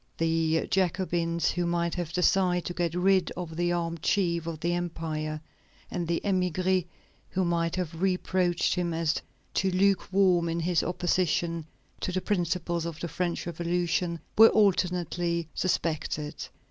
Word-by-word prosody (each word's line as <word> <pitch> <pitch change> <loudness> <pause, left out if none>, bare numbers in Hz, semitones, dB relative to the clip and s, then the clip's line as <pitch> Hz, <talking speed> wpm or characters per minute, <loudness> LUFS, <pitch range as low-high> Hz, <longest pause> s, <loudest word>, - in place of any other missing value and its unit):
The 165 0 +1
Jacobins, 175 -2 +1
who 175 -1 -1
might 170 0 0
have 175 -3 -3
desired 180 0 +2
to 175 - -3
get 170 -1 -1
rid 185 0 +3
of 170 -3 -5
the 175 +1 +1
armed 170 -2 -2
chief 170 -3 +1
of 165 -2 -4
the 170 +2 0
empire, 160 -3 -3 0.5
and 175 -2 -2
the 170 0 +1
émigrés, 185 -1 +1 0.4
who 185 0 0
might 170 -1 0
have 170 -2 -4
reproached 185 -2 +1
him 175 -2 -1
as 165 -1 0 0.3
too 190 - +1
luke 190 +1 +2
warm 185 -3 +3
in 165 +1 -1
his 170 0 +2
opposition 170 -2 0 0.3
to - - -2
the 185 - 0
principles 175 -3 -1
of 165 -2 -6
the 170 - -3
French 170 +2 -2
Revolution, 170 0 -1 0.2
were 225 +1 +9
alternately 175 -4 +1
suspected. 155 -3 -2
175 Hz, 145 wpm, -28 LUFS, 165-180 Hz, 0.5 s, were